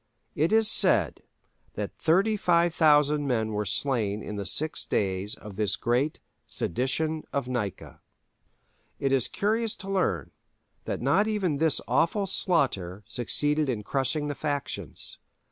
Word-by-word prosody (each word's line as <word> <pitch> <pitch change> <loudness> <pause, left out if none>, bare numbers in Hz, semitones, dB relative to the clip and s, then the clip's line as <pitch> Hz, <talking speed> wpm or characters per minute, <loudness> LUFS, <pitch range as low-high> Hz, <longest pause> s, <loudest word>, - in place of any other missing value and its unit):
It 155 +4 +1
is 220 0 +4
said - - +4 0.5
that - - -5
35,000 165 -6 +3
men 110 -4 0
were 105 0 -2
slain 105 -1 0
in 105 - -6
the 100 -1 -3
six 155 +1 0
days 95 +1 -1
of 105 -2 -11
this 105 -2 +2
great 125 +6 0 0.3
"Sedition 155 - -1
of 140 -3 -2
Nika." 115 -7 -5 1.0
It 135 - 0
is 135 -4 +2
curious 220 +2 0
to 195 - -11
learn 195 -2 -1 0.5
that - - -3
not 185 +11 +3
even 195 -9 0
this 160 +1 +2
awful 200 +5 +1
slaughter 105 - 0
succeeded 145 +4 0
in 110 -5 -2
crushing 140 +6 -1
the 145 - -2
factions. 145 -1 -4
145 Hz, 130 wpm, -27 LUFS, 115-170 Hz, 1.0 s, is